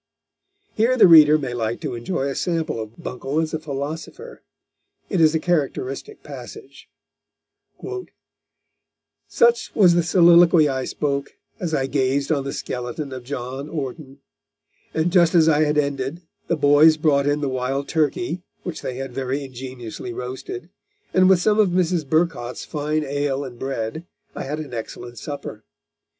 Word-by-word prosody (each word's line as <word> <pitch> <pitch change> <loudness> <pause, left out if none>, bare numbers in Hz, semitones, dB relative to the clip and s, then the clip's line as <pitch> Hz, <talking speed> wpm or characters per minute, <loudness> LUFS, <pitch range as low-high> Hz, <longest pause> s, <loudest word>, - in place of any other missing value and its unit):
Here 235 +4 +2
the - - +8
reader 155 -3 +8
may 135 -5 -4
like 115 -1 -2
to - - -3
enjoy 120 +5 -3
a 140 - -2
sample 165 -7 -2
of 110 +1 -9
Buncle 135 +1 -3
as 160 -1 -2
a 160 - -1
philosopher. 155 - -6 0.7
It 190 -5 +2
is 160 0 +5
a - - +2
characteristic 155 - -2
passage: - - -11 2.4
"Such 475 0 +2
was 180 -5 +6
the 175 - +3
soliloquy 170 -2 +6
I 130 -2 -2
spoke, 140 -1 -3 0.2
as 165 -3 -2
I 135 - 0
gazed 135 +1 0
on 140 -3 0
the 140 - -3
skeleton 125 +3 -5
of 130 -1 -7
John 130 +2 -5
Orton; 140 -2 -6 0.7
and 160 +2 0
just 175 -2 +4
as 160 -2 +6
I 155 -1 +4
had 150 0 0
ended, 140 +3 -1 0.2
the 170 - 0
boys 150 +2 +6
brought 145 -3 +2
in 145 +1 +1
the 145 - 0
wild 130 +2 -2
turkey, 165 +3 -1 0.2
which 165 -3 -5
they 125 - -4
had 135 -1 -6
very 135 +2 -2
ingeniously 125 -2 -7
roasted, 130 - -7 0.4
and 185 0 +5
with 190 - +6
some 210 +4 +2
of 210 -3 +5
Mrs. 175 -4 0
Burcot's 155 -7 0
fine 150 0 -2
ale 145 -1 -1
and 120 -2 -10
bread, 135 +5 -4 0.3
I - - -5
had 145 +3 -3
an 150 -5 -7
excellent 120 0 -7
supper. 140 -7 -7
145 Hz, 155 wpm, -22 LUFS, 130-165 Hz, 2.4 s, the